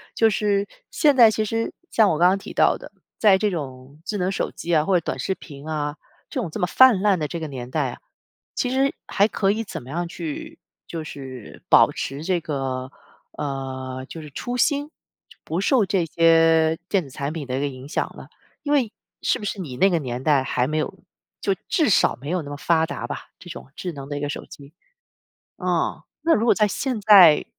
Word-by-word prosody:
就 225 -1 +4
是 205 -1 +1 0.2
现 295 -3 +3
在 235 -4 +8
其 215 0 -1
实 225 +2 -2 0.2
像 220 -3 +4
我 155 - +1
刚 175 - +5
刚 195 - +2
提 - - -9
到 - - +4
的， - - -12 0.3
在 200 -3 +6
这 210 +1 0
种 140 -3 -7
智 205 +3 -3
能 185 +1 0
手 - - -1
机 170 0 -4
啊、 155 - +4
或 185 -3 +3
者 - - -15
短 - - -3
视 190 +8 -1
频 145 0 -12
啊， 150 -1 -2 0.3
这 260 - -2
种 175 - -4
这 - - -6
么 - - +2
泛 235 +1 +6
滥 200 -4 +3
的 150 - -1
这 170 - -5
个 160 - -4
年 125 -4 -7
代 - - 0
啊， - - -11 0.6
其 250 - 0
实 270 +1 +1
还 200 +1 +2
可 195 -3 +1
以 220 +2 -1
怎 205 - -7
么 125 - -12
样 175 +2 -2
去 320 - -6 0.3
就 165 -2 -5
是 130 -6 -9
保 - - +7
持 140 +3 -5
这 185 0 +1
个， 135 -4 -4 0.5
呃， 130 -2 -5
就 160 -2 -8
是 150 - -11
初 245 - -4
心， 285 +3 +1 0.5
不 170 +4 -2
受 230 -1 +3
这 185 -1 +1
些 165 0 +4
电 195 -3 +2
子 135 - -13
产 140 +3 -4
品 155 -3 -5
的 130 0 -3
一 - - -1
个 145 - 0
影 130 0 -8
响 - - -2
呢？ - - -10 0.4
因 295 -1 0
为 245 -7 +2 0.3
是 - - +1
不 210 - -7
是 205 - -3
你 130 -7 -7
那 195 +4 +4
个 170 - +2
年 125 -2 -5
代 145 -3 +4
还 125 -1 0
没 155 - -2
有 190 +5 -4 0.4
就 195 -1 +1
至 320 -7 +2
少 195 - +4
没 140 - -6
有 180 -1 0
那 145 - -8
么 145 - -6
发 160 +2 +2
达 - - -5
吧， - - -7
这 175 - -12
种 - - -9
智 180 - -4
能 140 -1 -9
的 145 - -3
一 - - -3
个 145 - -1
手 - - -5
机。 140 +2 -14 0.8
哦， - - -1 0.2
那 330 - +3
如 220 - +2
果 - - +6
在 210 -2 +2
现 250 +1 -2
在 190 -7 +8
170 Hz, 245 characters per minute, -23 LUFS, 145-210 Hz, 0.8 s, 在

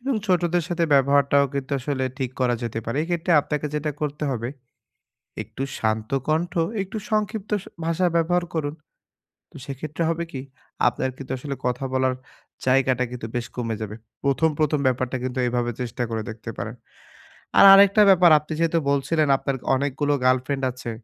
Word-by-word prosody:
এবং 265 +2 -1
ছোটদের 175 -2 +2
সাথে 170 -1 0
ব্যবহারটাও 140 +1 +4
কিন্তু 140 0 -3
আসলে 130 0 -2
ঠিক 130 -2 -2
করা 125 -1 +2
যেতে 115 -1 -3
পারে। 115 +4 -3
এক্ষেত্রে 175 +1 -1
আপনাকে 150 +1 -3
যেটা 150 0 -1
করতে 150 0 -3
হবে 120 -2 -3 0.9
একটু 135 - -8 0.2
শান্ত 110 0 -1 0.2
কন্ঠ, 160 +3 0 0.3
একটু 195 +3 -7
সংক্ষিপ্ত 215 -1 -1
স - - -15 0.2
ভাষা 165 +2 +1
ব্যবহার 175 +1 +2
করুন। 150 -2 -2 0.8
তো - - -22
সেক্ষেত্রে 145 +4 -4
হবে 165 +1 -1
কি? 130 - -5 0.5
আপনার 125 +2 0
কিন্তু 135 -1 -8
আসলে 140 +1 -5
কথা 125 +2 -1
বলার 130 -1 +1 0.5
জায়গাটা 130 -1 +3
কিন্তু 120 -2 -6
বেশ 120 -1 -1
কমে 115 -2 -2
যাবে। 105 0 -5 0.3
প্রথম, 140 +3 +2
প্রথম 150 -1 +2
ব্যাপারটা 130 0 0
কিন্তু 130 0 -3
এভাবে 120 0 -1
চেষ্টা 120 0 -3
করে 110 -1 -2
দেখতে 115 +1 -8
পারেন। 115 +4 -5 0.8
আর - - +9
আরেকটা 200 +2 +7
ব্যাপার 180 -2 +6
আপনি 150 +1 -9
যেহেতু 165 0 +2
বলছিলেন 150 +2 +1
আপনার 135 0 -2 0.2
অনেকগুলো 145 +2 0
গার্লফ্রেন্ড 130 +2 +1
আছে। 120 -1 -7
140 Hz, 165 wpm, -23 LUFS, 125-165 Hz, 0.9 s, আর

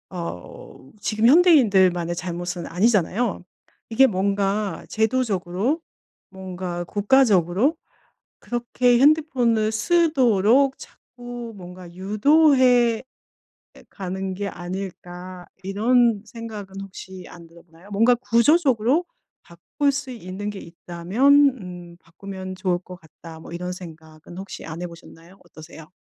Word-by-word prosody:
어 135 - -9
지금 215 +1 -1
현대인들만의 205 - +4
잘못은 175 0 -5
아니잖아요. 205 +3 0 0.5
이게 230 +4 +5
뭔가 200 -1 -1
'제도적으로 220 - -1 0.5
뭔가 185 -2 -6
국가적으로 205 - +2 0.6
그렇게 240 0 +1
핸드폰을 255 -7 +3
쓰도록 260 - +2
자꾸 240 -1 -10
뭔가 180 -1 -11
유도해 245 - +3 0.7
에 - - -17
가는 190 0 -5
게 200 +2 -4
아닐까?' 180 0 -8 0.2
이런 225 +2 +2
생각은 210 -5 -9
혹시 190 -1 -10
안 170 -1 -13
들어 170 +1 -18
보나요? 170 +3 -20
'뭔가 225 +5 +4
구조적으로 255 +3 +2 0.4
바꿀 175 - -2
수 270 -1 -4
있는 205 -2 -6
게 200 -2 -8
있다면 175 +9 -1 0.3
음 175 -2 -10
바꾸면 185 +2 -9
좋을 185 -2 -1
것 180 0 -12
같다.' 160 0 -13
뭐 - - -12
이런 180 +1 -4
생각은 160 -1 -12
혹시 195 0 -8
안 160 +2 -7
해 - - -3
보셨나요? 170 +1 -15
어떠세요? 160 -2 -13
195 Hz, 260 characters per minute, -22 LUFS, 175-240 Hz, 0.7 s, 이게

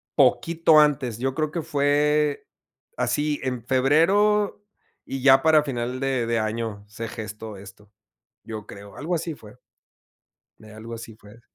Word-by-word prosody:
Poquito 155 +4 +4
antes, 130 -6 +2
yo 135 +1 -1
creo 155 -1 -1
que 170 - -3
fue 150 0 +1 0.5
así, 150 0 0
en 125 -3 -3
febrero, 190 +11 +2 0.4
y 135 -1 -5
ya 135 0 +6
para 155 -1 +5
final 125 -2 -3
de 135 -3 0
de 115 0 0
año 110 -1 -3
se 115 +2 -7
gestó 110 -2 -8
esto, 100 +1 -14 0.5
yo 110 -2 -7
creo. 100 0 -12
Algo 165 +5 -3
así 165 -1 -3
fue. 105 -7 -15 1.0
Algo 110 +2 -10
así 115 -1 -9
fue. 110 +2 -17
130 Hz, 140 wpm, -24 LUFS, 110-150 Hz, 1.0 s, ya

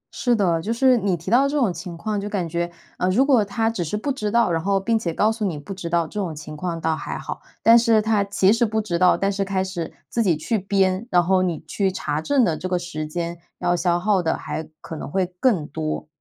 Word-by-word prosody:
是 245 -2 +2
的。 175 -6 +1
就 220 - -3
是， 255 +2 +4
你 195 -5 0
提 170 +6 -6
到 265 +4 +5
这 295 - -1
种 225 -10 +2
情 170 0 -7
况 210 +2 -2
就 205 - -4
感 190 -5 -2
觉， 170 +1 -2 0.3
嗯 180 - +1
如 245 +9 +3
果 255 -7 +4
它 225 +3 -1
只 210 -6 -2
是 170 +6 -3
不 275 +7 -2
知 215 -6 -2
道， 235 -4 +3
然 165 -1 0
后 195 0 +2
并 225 +4 +1
且 180 -7 -2
告 210 +6 +2
诉 220 -1 -4
你 175 -7 -1
不 145 +7 -7
知 180 -3 -6
道， 170 0 +2
这 210 - -6
种 165 -5 -3
情 150 0 -8
况 170 +1 -3
倒 160 0 0
还 - - -5
好。 - - -6 0.2
但 230 +1 +8
是 230 -2 +4
它 215 -2 +2
其 200 0 +3
实 235 +1 +1
不 220 0 +1
知 180 -5 -2
道， 180 0 +5
但 195 +1 +1
是 195 0 -1
开 190 -1 -1
始 180 -4 -5 0.2
自 235 - 0
己 175 -7 +2
去 215 +7 -1
编， 195 +2 +1
然 180 -1 +4
后 185 +1 +3
你 175 -4 -1
去 195 -2 0
查 150 -4 -2
证 270 - +3
的 160 - +1
这 185 - -5
个 180 - +1
时 155 -3 -5
间 170 +1 -4 0.2
要 175 - +1
消 175 0 +1
耗 200 -1 +2
的 160 - 0
还 160 - -5
可 160 - -7
能 150 - -6
会 190 +3 +1
更 200 - +2
多。 155 0 -4
190 Hz, 285 characters per minute, -22 LUFS, 170-215 Hz, 0.3 s, 但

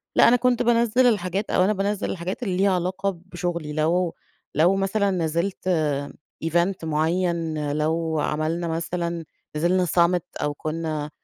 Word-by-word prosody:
لأ - - +7
أنا 240 - +6
كنت 245 0 +2
بانزّل 235 +1 +3
الحاجات 200 -2 0
أو 185 - +3
أنا 210 - +3
بانزّل 200 +1 -1
الحاجات 185 +7 -4
ليها 195 -1 +2
علاقة 185 +2 0 0.2
بشغلي، 170 -4 -4
لو 165 +3 +1 0.4
لو 170 +6 +4
مثلًا 195 +1 +1
نزّلت 170 +2 -1 0.8
event، 175 +3 +1
معيّن، 160 -1 0
لو 160 +1 0
عملنا 155 +3 -1
مثلًا 170 0 -3 0.3
نزّلنا 180 +4 +2
summit، 170 +1 +1
أو 150 - 0
كنّا 155 0 -3
175 Hz, 135 wpm, -24 LUFS, 160-195 Hz, 0.8 s, لأ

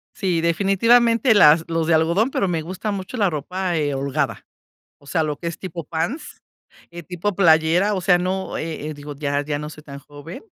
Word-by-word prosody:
Sí, 180 -5 -1
definitivamente 225 +7 +3
las 160 -5 +6
los 165 -1 -1
de 165 - +3
algodón, 170 +11 +2
pero 195 - 0
me 170 -3 -1
gusta 185 +6 -5
mucho 200 +5 -6
la 200 -4 +2
ropa, 175 +4 -3
eh, 145 -2 -1
holgada. 135 0 -2 0.5
O - - -22
sea, 160 +2 0
lo 150 -1 -3
que 170 - -6
es 170 - -5
tipo 175 -3 -6
pants, 170 - -5 0.5
eh, 170 0 -10
tipo 180 +3 -3
playera, 170 +3 +3
o 185 - -2
sea, 180 -1 +4
no, 185 +2 -3
eh, 155 -2 -5
eh, 155 - -5
digo, 145 0 -9
ya 145 0 -1
ya 145 0 -3
no 150 - -6
soy 155 0 -13
tan 140 -2 -10
joven, 145 - -11
170 Hz, 205 wpm, -21 LUFS, 155-190 Hz, 0.5 s, las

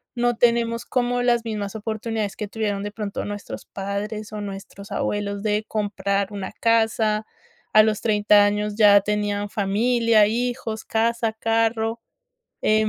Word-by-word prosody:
no 240 0 +1
tenemos 235 0 +2
como 245 -1 0
las 240 -1 +2
mismas 210 -2 -4
oportunidades 220 -1 -3
que 210 - -4
tuvieron 205 -2 -2
de 205 - -4
pronto 210 -2 -4
nuestros 205 0 -7
padres, 205 +2 -5
o 210 - -4
nuestros 200 0 -8
abuelos 200 0 -2
de 210 0 0
comprar 200 -1 -1
una 195 -2 -5
casa, 220 -1 +1 0.5
a 215 - +8
los 215 -1 0
30 210 -2 +4
años 210 0 -1
ya 205 -2 +7
tenían 205 0 -1
familia, 220 +2 +3
hijos, 235 -1 -2
casa, 230 0 0
carro, 225 0 0 0.6
em, 215 0 +3
215 Hz, 140 wpm, -23 LUFS, 205-230 Hz, 0.6 s, a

